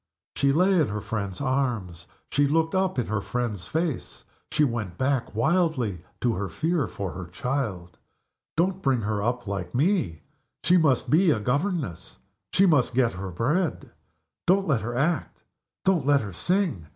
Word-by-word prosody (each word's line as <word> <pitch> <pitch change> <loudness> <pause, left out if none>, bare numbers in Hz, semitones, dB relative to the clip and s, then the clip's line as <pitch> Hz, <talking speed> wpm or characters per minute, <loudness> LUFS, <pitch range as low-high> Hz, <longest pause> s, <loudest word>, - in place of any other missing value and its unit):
She 140 - +3
lay 180 +4 +4
in 150 - +2
her 105 +1 -3
friend's 100 -3 -4
arms; 120 -11 -1 0.2
she 145 0 +3
looked 160 +2 +1
up 190 -3 +1
in 125 - +1
her 110 -1 -1
friend's 110 -6 -3
face; 160 -4 -3 0.3
she 150 - +3
went 110 -9 -2
back 130 -4 0
wildly 125 - +1 0.2
to 120 -2 +2
her 95 -1 -3
fear 160 -5 0
for 95 0 -5
her 90 -1 -7
child. 95 - -3 0.6
"Don't 185 +3 +1
bring 135 -6 +2
her 105 -1 -1
up 120 +3 -1
like 100 +1 -4
Me! 130 - +1 0.4
She 180 - +4
must 150 -7 +2
be 170 +4 +5
a 140 - +3
governess 135 - -2 0.3
she 195 - +4
must 140 -9 +3
get 125 -3 +3
her 95 +1 -5
bread. 150 - -1 0.6
Don't 195 +2 +4
let 135 -8 +2
her 120 +2 -4
act! 155 +5 -1 0.4
don't 175 -8 +2
let 145 -1 +5
her 100 -4 -6
sing! 175 - 0
130 Hz, 165 wpm, -26 LUFS, 100-160 Hz, 0.6 s, be